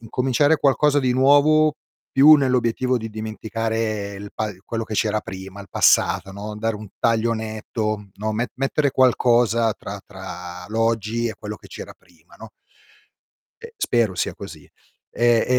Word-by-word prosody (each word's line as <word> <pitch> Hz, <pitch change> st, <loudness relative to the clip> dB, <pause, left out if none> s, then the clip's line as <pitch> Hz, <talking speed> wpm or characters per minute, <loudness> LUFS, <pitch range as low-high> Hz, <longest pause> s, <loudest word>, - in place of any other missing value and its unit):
incominciare 130 Hz, +6 st, +1 dB
qualcosa 145 Hz, +1 st, +3 dB
di 130 Hz, -3 st, +1 dB
nuovo, 145 Hz, +4 st, +4 dB, 0.4 s
più 145 Hz, +3 st, +8 dB
nell'obiettivo 130 Hz, -2 st, +1 dB
di 115 Hz, -1 st, -6 dB
dimenticare 110 Hz, -1 st, -3 dB
il 100 Hz, +1 st, -9 dB
pa 110 Hz, -1 st, -2 dB
quello 115 Hz, -1 st, -3 dB
che 110 Hz, -, -6 dB
c'era 110 Hz, 0 st, +1 dB
prima, 95 Hz, +1 st, -9 dB
il 100 Hz, -, -12 dB
passato, 95 Hz, +3 st, +3 dB
no, 105 Hz, +2 st, -7 dB
dare 110 Hz, 0 st, -1 dB
un 105 Hz, -1 st, -10 dB
taglio 115 Hz, 0 st, +2 dB
netto, 110 Hz, -1 st, -4 dB
no, 110 Hz, +2 st, -3 dB
met 115 Hz, +3 st, -2 dB
mettere 135 Hz, +2 st, 0 dB
qualcosa 120 Hz, -3 st, +3 dB
tra 100 Hz, 0 st, -8 dB
tra 90 Hz, -2 st, -9 dB
l'oggi 115 Hz, +1 st, 0 dB
e 110 Hz, -, -5 dB
quello 105 Hz, 0 st, -6 dB
che -, -, -16 dB
c'era -, -, -9 dB
prima, 85 Hz, -2 st, -24 dB
no? 110 Hz, -1 st, -11 dB, 1.1 s
Eh, 460 Hz, 0 st, -11 dB
spero 115 Hz, -, +1 dB
sia 90 Hz, -, -2 dB
così. -, -, -11 dB, 0.4 s
Eh, 120 Hz, -1 st, +3 dB
115 Hz, 150 wpm, -22 LUFS, 105-125 Hz, 1.1 s, più